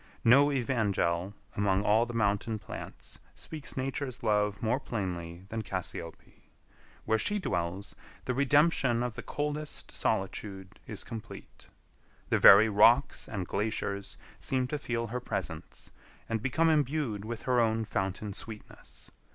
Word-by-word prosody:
No 140 +5 +6
evangel 100 -8 0 0.2
among 100 -1 +2
all 110 +3 +3
the 120 - -6
mountain 105 0 +1
plants - - -9 0.2
speaks 155 -4 -7
Nature's 135 -1 -3
love 105 -2 +1
more 115 +4 +1
plainly 90 -7 -4
than 110 0 -3
cassiope. 90 -4 -7 0.6
Where 110 0 +2
she 205 - 0
dwells, 95 - -2 0.3
the 125 - 0
redemption 140 -3 +3
of 125 -2 -2
the - - -6
coldest 150 +1 -4
solitude 95 0 -2
is 105 - -3
complete. 115 -3 -10 0.6
The - - +3
very 100 +3 +9
rocks 115 +6 +4
and 100 -4 -3
glaciers 100 -1 -2 0.2
seem 130 -1 0
to 150 - -2
feel 115 -3 -2
her 120 +3 -3
presence, 125 - -5 0.4
and 115 -1 -1
become 160 +6 +2
imbued 145 -8 0
with 115 +1 -6
her 125 -1 +2
own 115 -1 +2
fountain 95 0 -2
sweetness. 105 +1 -10
110 Hz, 135 wpm, -30 LUFS, 100-130 Hz, 0.6 s, very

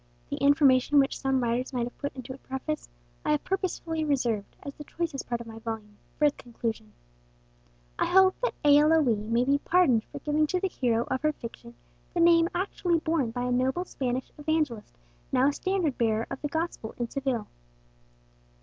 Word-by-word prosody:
The - - -2
information 280 -1 +4
which 275 -1 +3
some 270 -2 +1
writers 240 +3 -1
might 245 -2 0
have 245 - -5
put 285 -1 -4
into 260 0 -7
a 265 - -12
preface, 265 +4 -5 0.3
I 300 - +2
have 300 - 0
purposely 350 -4 -2
reserved, 240 -8 -1
as 280 - -6
the 295 - -10
choicest 320 -2 -4
part 235 -1 -1
of - - -8
my 225 0 -9
volume, 220 -2 -6 0.2
for 300 - +3
its 290 - +2
conclusion. 225 - -5 1.1
I - - +3
hope 380 0 +6
that - - 0
A. 290 0 +8
L. 305 +1 +4
O. 315 -4 +4
E. 230 - +4
may 225 +3 0
be 280 +2 +3
pardoned 285 -10 +3
for - - -10
giving 305 +1 +1
to 365 +4 0
the 385 - -1
hero 235 -7 +1
of 260 - 0
her 305 0 +2
fiction 235 -2 -10 0.4
the - - +1
name 335 0 +5
actually 355 -2 0
borne 315 -6 0
by 245 +2 -3
a 250 - -1
noble 260 +8 +1
Spanish 255 -5 -3
evangelist 295 -7 -1 0.3
now 265 +1 +4
a - - -2
standard 370 -5 -1
bearer 225 -1 +1
of - - -5
the 295 - -1
gospel 320 -7 -3
in 240 - -2
Seville. 260 -4 -2
275 Hz, 195 wpm, -28 LUFS, 240-315 Hz, 1.1 s, A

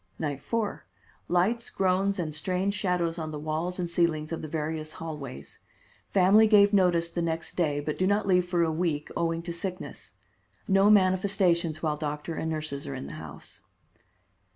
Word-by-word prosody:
Night 145 -3 -3
4: 225 +2 -2 0.4
Lights, 205 +7 +1
groans 195 +1 +1
and 160 -4 -3
strange 185 +6 0
shadows 180 -4 0
on 160 -1 -4
the 155 - -5
walls 155 +4 -2
and 180 -2 -2
ceilings 170 -2 0
of 165 - -3
the 155 - -5
various 155 0 -3
hallways. 140 - -7 0.5
Family 200 +4 +5
give 205 -1 +6
notice 175 -4 +4
the 170 +1 -3
next 165 0 -2
day, 150 -5 +1
but 150 +1 -4
do 185 - +2
not 205 +2 +2
leave 180 -2 +4
for 175 -2 +2
a 165 - +1
week, 155 -2 -1
owing 165 0 -1
to 170 0 -4
sickness. 185 +2 -6 0.5
No 195 +1 +5
manifestations 185 -5 +3
while 150 -2 0
doctor 150 +2 -4
and 160 - -3
nurses 155 -3 -4
are 70 - -4
in - - -6
the 70 - -8
house. - - -8
170 Hz, 175 wpm, -28 LUFS, 155-190 Hz, 0.5 s, give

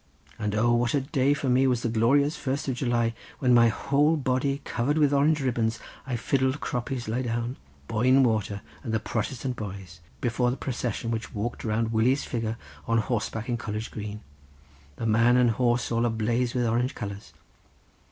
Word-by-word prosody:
And 105 0 -1
O, 120 +2 +3
what 120 +2 +2
a 140 - +2
day 140 0 +1
for 140 - -3
me 130 +1 +4
was 125 -2 +1
the - - +1
glorious 135 +7 +3
first 140 -3 -3
of 130 - +1
July 120 -2 0 0.2
when 125 -2 +2
with - - +7
my 115 -1 +7
whole 145 +7 +2
body 135 0 0
covered 135 +6 0
with 145 -2 +3
Orange 150 +2 +3
ribbons 115 -3 0 0.3
I 130 - -1
fiddled 130 +3 0
'Croppies 125 -1 -3
Lie 115 +4 -1
Down'—'Boyne 115 - 0
Water,' 105 -4 0 0.2
and 115 -4 -2
the - - +2
'Protestant 125 +4 -3
Boys' 95 -4 -7 0.2
before 120 -1 +1
the 125 - -2
procession 120 -3 -3
which 115 +1 -4
walked 110 +3 -3
round 110 +1 0
Willie's 125 +6 +2
figure 115 -2 -3 0.3
on 115 - +2
horseback 115 0 -2
in 120 -2 -1
College 110 -1 -5
Green, 105 0 -6 0.7
the 115 - -4
man 115 +3 +4
and 125 -2 +4
horse 120 +1 +1
all 115 +1 +2
ablaze 120 +2 0
with 125 -1 +1
Orange 120 +3 0
colours. 100 0 -6
120 Hz, 180 wpm, -27 LUFS, 110-130 Hz, 0.7 s, with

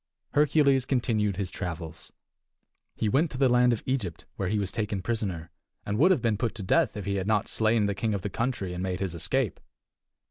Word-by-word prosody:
Hercules 145 -3 +3
continued 110 -7 +1
his 95 -3 -3
travels. 85 -3 -6 0.8
He 110 - -1
went 145 +9 +2
to 130 - -7
the 135 0 +4
land 125 0 +4
of 115 - -2
Egypt, 115 - -2
where 95 -2 -2
he 105 - 0
was 100 -2 -1
taken 105 -4 -2
prisoner, 95 -8 -3 0.3
and 105 +2 -2
would 170 +6 +6
have 180 -11 +2
been 110 -3 +2
put 120 -2 -1
to 105 - -5
death 95 - +2
if 100 - -5
he 100 0 -1
had 95 0 -2
not 105 -2 +2
slain 110 -1 +2
the 100 - 0
king 105 +2 -1
of 95 - -4
the 105 - -2
country 115 -6 -2
and 90 - -4
made 95 -1 -2
his 95 -3 -2
escape. 95 +8 0
105 Hz, 215 wpm, -27 LUFS, 95-125 Hz, 0.8 s, would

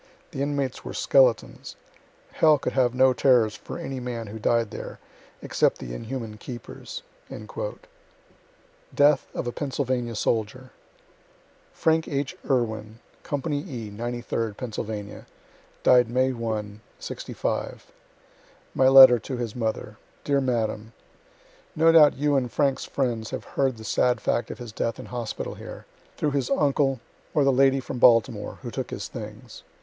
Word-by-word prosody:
The 135 - -5
inmates 140 -2 -2
were - - -7
skeletons. - - +2 0.6
Hell 155 -2 +4
could 145 - -3
have 125 -2 +2
no 130 0 +5
terrors 120 -4 +3
for - - -8
any 135 -1 -5
man 120 -2 -5
who 110 +1 -8
died 115 0 +1
there, - - -7 0.5
except - - +1
the - - -7
inhuman 115 - -6
keepers.'" 125 - -8 0.3
DEATH - - -3
OF - - -3
A 120 - -2
PENNSYLVANIA 130 -4 -2
SOLDIER 115 +4 -2 1.0
Frank 160 0 +1
H. 140 -2 -2
Irwin, 110 -4 -1 0.2
company 145 0 -2
E, 125 - -7
93rd 115 -1 -3
Pennsylvania 105 -4 -6 0.6
died 125 -2 +5
May 130 +2 +2
1, 110 -3 -4 0.2
'65 - - -4 0.8
My 130 - +4
letter 130 -2 +9
to 130 +3 -5
his 120 -3 -4
mother 110 -3 -3 0.3
Dear 140 -1 +1
madam: 115 -3 -2 0.8
No 165 +1 +5
doubt 155 -3 +6
you 145 +1 +1
and 125 -3 0
Frank's 140 -2 +1
friends 120 -5 -2
have - - -5
heard 135 -3 -1
the 110 - -10
sad 120 +3 +1
fact 120 - -1
of - - -6
his 120 -3 -8
death 115 +1 -2
in - - -8
hospital 120 -3 -5
here, - - -10 0.3
through 150 - 0
his 135 -3 -1
uncle, 140 -5 +2 0.4
or 150 - +4
the 135 - +4
lady 135 +1 +4
from 130 -1 -6
Baltimore, 115 -2 +3
who - - -5
took - - -4
his - - -5
things. - - -9
125 Hz, 145 wpm, -25 LUFS, 115-140 Hz, 1.0 s, letter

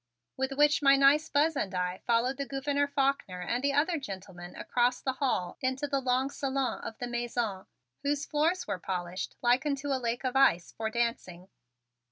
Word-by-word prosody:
With 265 +1 -2
which 295 +2 +4
my 275 -1 +6
nice 285 +3 +4
Buzz 300 +2 +2
and 200 -8 -2
I 180 0 -1
followed 240 +3 +2
the 280 -1 -3
Gouverneur 285 +1 0
Faulkner 275 -10 0
and 240 +8 -2
the 280 0 +2
other 310 +3 +2
gentlemen 190 -7 -8
across 245 0 +1
the 265 - -2
hall 255 -10 -1
into 260 +2 -1
the 275 -1 -1
long 260 +1 +1
salon 270 -2 -2
of 225 - -6
the 245 - -4
Mansion, 240 -5 -3 0.3
whose 285 0 -1
floors 320 +5 +1
were - - -3
polished 180 0 -4
like 245 +2 +4
unto 285 -1 -2
a 265 -2 0
lake 235 +1 -2
of 255 0 -2
ice, 225 -11 +4
for 220 0 -2
dancing. 220 -6 -3
260 Hz, 185 wpm, -30 LUFS, 220-280 Hz, 0.3 s, my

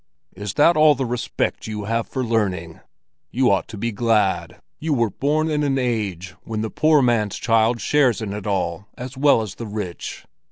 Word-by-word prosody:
Is 100 +1 -5
that 165 +4 +5
all 155 -1 +6
the 135 0 -2
respect 120 -1 -2
you 105 -1 -4
have 115 +2 -1
for 130 - -3
learning? 95 -8 -1 0.5
You 130 -3 +2
ought 95 -4 +1
to 115 - -9
be 115 +3 -2
glad 105 -3 0 0.2
you 155 -1 0
were 115 -4 +1
born 150 - 0
in 150 -1 0
an 140 -2 +1
age 105 -8 -2
when 110 -1 -4
the 110 - -3
poor 155 -2 +4
man's 115 -5 +1
child 115 +1 +2
shares 135 -4 +2
in 105 -3 -4
it 105 0 -6
all 95 -1 -2
as 125 +2 -7
well 135 -4 +4
as 105 -3 -6
the 115 - -7
rich. 100 -4 -6
115 Hz, 195 wpm, -22 LUFS, 105-130 Hz, 0.5 s, all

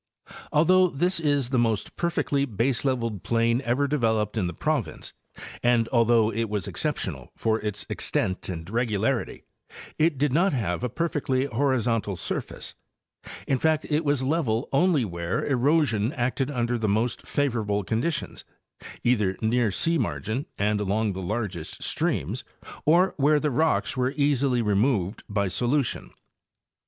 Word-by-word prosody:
Although 185 +4 +5
this 175 +5 0
is 145 -5 +1
the 130 - +2
most 115 -3 0
perfectly 145 -5 0
baseleveled 115 -2 -1
plain 115 +1 +1
ever 130 +4 +1
developed 110 -7 0
in 100 -5 0
the - - -3
province, 150 -7 -2 0.5
and 120 -2 +3
although 115 -2 +3
it 115 -1 -1
was 105 -2 -2
exceptional 95 - -3
for 110 0 +1
its 105 -2 -4
extent 95 0 -1
and 85 -2 -5
regularity, 115 +2 -1 0.6
it 155 -2 +3
did 145 -1 +1
not 175 +4 +3
have 105 -5 -1
a 125 - 0
perfectly 135 -2 -1
horizontal 120 -7 0
surface; - - -5 0.7
in 135 - +1
fact, 155 +1 +1
it 150 +2 +2
was 145 -3 +1
level 130 -5 0
only 150 -3 +3
where 85 -2 -3
erosion 130 -4 +2
acted 130 0 -1
under 120 -3 -1
the 110 -2 0
most 110 +4 -1
favorable 110 -8 0
conditions, 135 - -2 0.6
either 105 -6 +2
near 115 +1 +2
sea 165 - +1
margin 120 +2 -2
and 105 +1 +1
along 105 +1 0
the 95 - -5
largest 95 -4 -4
streams - - -1 0.4
or 175 +5 +4
where 150 +1 +4
the 150 0 0
rocks 155 +2 +1
were 130 +2 0
easily 140 -4 +2
removed 105 -1 +1
by 100 -1 0
solution. 125 +7 -1
120 Hz, 140 wpm, -26 LUFS, 105-145 Hz, 0.7 s, Although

